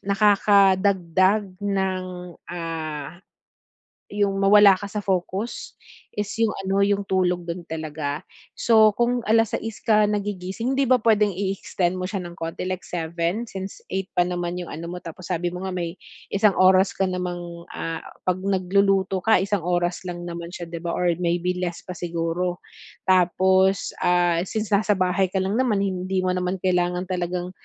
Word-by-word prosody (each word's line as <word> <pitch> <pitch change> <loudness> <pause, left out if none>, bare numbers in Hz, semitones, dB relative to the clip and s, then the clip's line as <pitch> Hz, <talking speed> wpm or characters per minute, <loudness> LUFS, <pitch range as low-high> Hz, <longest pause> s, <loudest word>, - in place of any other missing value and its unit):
nakakadagdag 195 -1 +3
ng, 190 -2 -1 0.4
ah, 165 -2 -5 0.9
yung 200 -1 0
mawala 200 0 +7
ka 200 - -5
sa 205 +1 -4
focus 190 +4 -2 0.4
is 205 0 -2
yung 225 -2 +2
ano 195 +1 0
yung 200 0 +2
tulog 180 -2 0
dun 170 0 -6
talaga. 155 0 -4 0.3
So, 220 -2 +5
kung 240 +1 +1
6:00 225 0 +1
ka 215 -2 +4
nagigising 205 +3 -2
hindi 275 - +2
ba 255 - +6
pwedeng 210 -4 +3
i-extend 185 -2 -1
mo 185 - -2
siya 195 -2 -4
ng 175 - -7
konti 165 0 -4
like 185 0 -4
7:00 170 +5 -2
since 190 0 -7
8:00 190 0 -2
pa 175 - +4
naman 175 0 -3
yung - - -9
ano 170 +2 -6
mo, 180 +1 -7
tapos 170 +2 -9
sabi 175 -1 -1
mo 180 +2 -5
nga 185 - -4
may 170 0 -4 0.3
isang 200 0 +3
oras 185 +1 +4
ka - - 0
namang, 175 -2 -4
ah, 165 0 -3 0.2
'pag 185 0 0
nagluluto 195 0 +1
ka 205 -1 +3
isang 195 -4 -1
oras 175 +1 0
lang 175 0 -5
naman 170 +1 -6
siya, 170 -1 -7
'di 170 - -5
ba, 170 0 -3
or 180 -1 +2
maybe 175 +1 0
less 175 -2 -3
pa - - -7
siguro. 175 0 -3 0.4
Tapos, 190 +1 +3
ah, 175 -1 +3
since 215 -2 -3
nasa 205 0 +3
bahay 185 +1 +1
ka 190 +1 -1
lang 205 +6 0
naman, 215 -6 +2
hindi 185 0 -1
mo 185 - +1
naman 180 +1 -1
kailangan 180 -1 +1
talagang 180 0 -2
185 Hz, 165 wpm, -24 LUFS, 175-200 Hz, 0.9 s, mawala